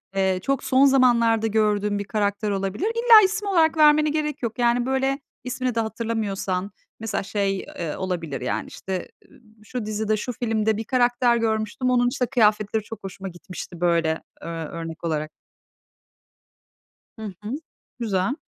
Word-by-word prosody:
eee, 190 Hz, -1 st, +2 dB
çok 275 Hz, 0 st, 0 dB
son 265 Hz, +1 st, +4 dB
zamanlarda 235 Hz, -4 st, +4 dB
gördüğün 210 Hz, -1 st, +1 dB
bir 205 Hz, -, -2 dB
karakter 205 Hz, 0 st, -1 dB
olabilir. 195 Hz, -, -1 dB
İlla 460 Hz, -1 st, +7 dB
isim 415 Hz, +2 st, -2 dB
olarak 330 Hz, -5 st, +3 dB
vermene 305 Hz, 0 st, +6 dB
gerek 300 Hz, -1 st, -2 dB
yok. 235 Hz, +2 st, -3 dB
Yani 240 Hz, 0 st, +2 dB
böyle 265 Hz, +1 st, 0 dB, 0.2 s
ismini 250 Hz, -1 st, -2 dB
de -, -, +1 dB
hatırlamıyorsan 215 Hz, -4 st, -2 dB, 0.3 s
mesela 220 Hz, -3 st, -2 dB
şey, 195 Hz, 0 st, -1 dB
eee, 165 Hz, -4 st, -5 dB
olabilir 170 Hz, -6 st, -3 dB
yani -, -, -2 dB
işte, 190 Hz, -1 st, -5 dB, 0.2 s
ııı, 275 Hz, -, -19 dB, 0.2 s
şu 235 Hz, +1 st, -5 dB
dizide, 215 Hz, 0 st, -1 dB
şu 250 Hz, +4 st, -3 dB
filmde 220 Hz, -2 st, 0 dB
bir 220 Hz, -, -3 dB
karakter 245 Hz, 0 st, +2 dB
görmüştüm. 220 Hz, +2 st, -1 dB
Onun 245 Hz, -1 st, +3 dB
işte 250 Hz, -, -1 dB
kıyafetleri 215 Hz, -3 st, +2 dB
çok 225 Hz, 0 st, -10 dB
hoşuma 195 Hz, 0 st, -6 dB
gitmişti 175 Hz, 0 st, -9 dB
böyle 165 Hz, -2 st, +2 dB, 0.2 s
ö -, -, -8 dB
örnek 165 Hz, 0 st, -6 dB
olarak. 155 Hz, -2 st, -2 dB, 1.9 s
Hı 220 Hz, -, -10 dB, 0.2 s
hı. 210 Hz, -, -5 dB, 0.5 s
Güzel. 205 Hz, +1 st, 0 dB
220 Hz, 150 wpm, -24 LUFS, 195-250 Hz, 1.9 s, İlla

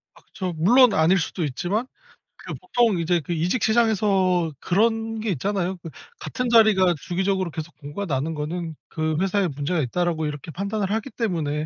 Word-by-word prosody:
아 -, -, -19 dB
그쵸. 185 Hz, -3 st, -5 dB
물론 240 Hz, +8 st, +5 dB
아닐 165 Hz, +4 st, +4 dB
수도 170 Hz, +1 st, -3 dB
있지만 175 Hz, -, -2 dB, 0.5 s
그 -, -, -8 dB
보통 240 Hz, -, +1 dB
이제 170 Hz, +1 st, +1 dB
그 160 Hz, +3 st, -6 dB
이직 175 Hz, +9 st, 0 dB
시장에서 195 Hz, -7 st, +2 dB
그런 225 Hz, +3 st, 0 dB
게 220 Hz, -1 st, -2 dB
있잖아요. 190 Hz, +2 st, -1 dB
그 165 Hz, -, -7 dB, 0.3 s
같은 250 Hz, -1 st, -3 dB
자리가 215 Hz, -6 st, +5 dB
주기적으로 190 Hz, +1 st, -1 dB
계속 160 Hz, +1 st, -7 dB
공고가 150 Hz, +7 st, -6 dB
나는 150 Hz, +1 st, -2 dB
거는 160 Hz, +2 st, -4 dB
'그 155 Hz, -1 st, -2 dB
회사에 195 Hz, 0 st, +1 dB
문제가 150 Hz, +4 st, -2 dB
있다.'라고 160 Hz, +3 st, -1 dB
이렇게 150 Hz, +1 st, -6 dB
판단을 200 Hz, +3 st, -3 dB
하기 220 Hz, +5 st, -2 dB
때문에 175 Hz, -13 st, -2 dB
180 Hz, 375 characters per minute, -23 LUFS, 160-215 Hz, 0.5 s, 물론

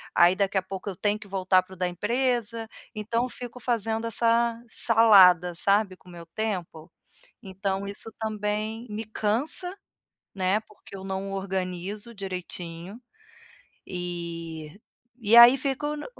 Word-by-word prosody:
aí 175 Hz, +2 st, +6 dB
daqui 195 Hz, 0 st, 0 dB
a -, -, +3 dB
pouco 190 Hz, +2 st, -6 dB
eu 190 Hz, -, -5 dB
tenho 205 Hz, +3 st, 0 dB
que 210 Hz, -, -11 dB
voltar 185 Hz, -1 st, +2 dB
para 190 Hz, -, -15 dB
o -, -, -12 dB
da 180 Hz, 0 st, 0 dB
empresa. 230 Hz, +3 st, -1 dB, 0.2 s
Então 230 Hz, +3 st, -1 dB
fico 245 Hz, 0 st, -8 dB
fazendo 225 Hz, -1 st, -1 dB
essa 230 Hz, +1 st, +1 dB
salada, 190 Hz, -7 st, +6 dB
sabe, 200 Hz, +2 st, +2 dB
com 185 Hz, -, -19 dB
o -, -, -12 dB
meu 170 Hz, -1 st, -10 dB
tempo? 175 Hz, -4 st, -4 dB, 0.5 s
Então 195 Hz, 0 st, -3 dB
isso 200 Hz, +3 st, -5 dB
também 215 Hz, +1 st, -3 dB
me 215 Hz, +2 st, -5 dB
cansa, 235 Hz, -, 0 dB, 0.6 s
né, 190 Hz, +2 st, +1 dB
porque 210 Hz, -2 st, -15 dB
eu 190 Hz, -, -8 dB
não 195 Hz, 0 st, -4 dB
organizo 190 Hz, +3 st, -4 dB
direitinho, 180 Hz, +1 st, -7 dB, 0.9 s
e 170 Hz, -2 st, -6 dB, 0.4 s
e 225 Hz, -1 st, +3 dB
aí 240 Hz, +3 st, +10 dB
fico 280 Hz, +2 st, -2 dB
n 295 Hz, -, -7 dB
200 Hz, 140 wpm, -26 LUFS, 185-225 Hz, 0.9 s, aí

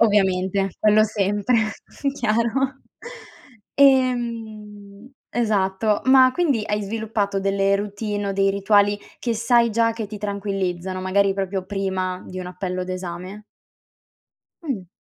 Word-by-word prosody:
Ovviamente, 195 Hz, -2 st, +2 dB
quello 215 Hz, 0 st, +5 dB
sempre, 205 Hz, +2 st, +1 dB, 0.6 s
chiaro. 235 Hz, +3 st, 0 dB, 0.9 s
Ehm, 230 Hz, -5 st, 0 dB, 0.2 s
esatto, 210 Hz, -2 st, 0 dB
ma 260 Hz, -1 st, +6 dB
quindi 280 Hz, -9 st, +1 dB
hai 210 Hz, 0 st, -1 dB
sviluppato 205 Hz, -1 st, -2 dB
delle 195 Hz, 0 st, +1 dB
routine 205 Hz, 0 st, -3 dB
o -, -, -1 dB
dei 195 Hz, 0 st, +2 dB
rituali, 205 Hz, +1 st, +3 dB, 0.2 s
che 235 Hz, -2 st, -1 dB
sai 235 Hz, +1 st, +3 dB
già 230 Hz, +1 st, +2 dB
che 225 Hz, -1 st, -5 dB
ti 210 Hz, +1 st, -8 dB
tranquillizzano, 195 Hz, -3 st, -3 dB
magari 195 Hz, +1 st, +2 dB
proprio 195 Hz, -1 st, -3 dB
prima, 190 Hz, -2 st, -2 dB
di 185 Hz, -, -7 dB
un 180 Hz, -, -5 dB
appello 180 Hz, 0 st, -4 dB
d'esame? 185 Hz, +2 st, -6 dB, 1.2 s
Mh. 230 Hz, -, -4 dB
205 Hz, 115 wpm, -22 LUFS, 195-225 Hz, 1.2 s, ma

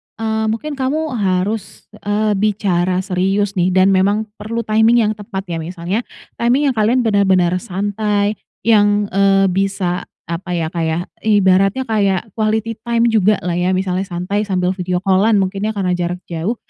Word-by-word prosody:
eee, 220 Hz, 0 st, -1 dB
mungkin 230 Hz, +8 st, -3 dB
kamu 300 Hz, +4 st, -1 dB
harus, 195 Hz, +2 st, -2 dB
eee, 210 Hz, +1 st, 0 dB
bicara 185 Hz, -3 st, 0 dB
serius 195 Hz, +1 st, 0 dB
nih 180 Hz, +1 st, +1 dB
dan 190 Hz, +1 st, +5 dB
memang 200 Hz, +3 st, +2 dB, 0.2 s
perlu 230 Hz, +2 st, -3 dB
timing 220 Hz, +2 st, +3 dB
yang 215 Hz, -, +1 dB
tepat 200 Hz, -2 st, -6 dB
ya, 165 Hz, -, -2 dB
misalnya 175 Hz, +4 st, -3 dB, 0.4 s
timing 265 Hz, +4 st, +2 dB
yang -, -, -7 dB
kalian 235 Hz, +4 st, +2 dB
bener-bener 190 Hz, -5 st, +3 dB
santai 205 Hz, +1 st, -1 dB, 0.2 s
yang, 205 Hz, -2 st, +3 dB
eee, 195 Hz, -1 st, +3 dB
bisa 190 Hz, -1 st, -1 dB, 0.2 s
apa 175 Hz, +1 st, -3 dB
ya 160 Hz, -2 st, -2 dB
kayak 165 Hz, +1 st, -2 dB, 0.2 s
ibaratnya 195 Hz, +3 st, +3 dB
kayak 210 Hz, -3 st, 0 dB
quality 220 Hz, +1 st, -1 dB
time 235 Hz, -1 st, +2 dB
jugalah 210 Hz, -4 st, +2 dB
ya 180 Hz, +2 st, 0 dB
misalnya 185 Hz, 0 st, -1 dB
santai 190 Hz, +4 st, -2 dB
sambil 180 Hz, -2 st, 0 dB
video 180 Hz, -1 st, -3 dB
call-an 200 Hz, +3 st, +3 dB
mungkin 195 Hz, 0 st, 0 dB
ya 220 Hz, -, -3 dB
karena 190 Hz, -3 st, -1 dB
jarak 180 Hz, 0 st, -2 dB
jauh. 175 Hz, +7 st, -3 dB
195 Hz, 155 wpm, -17 LUFS, 185-215 Hz, 0.4 s, dan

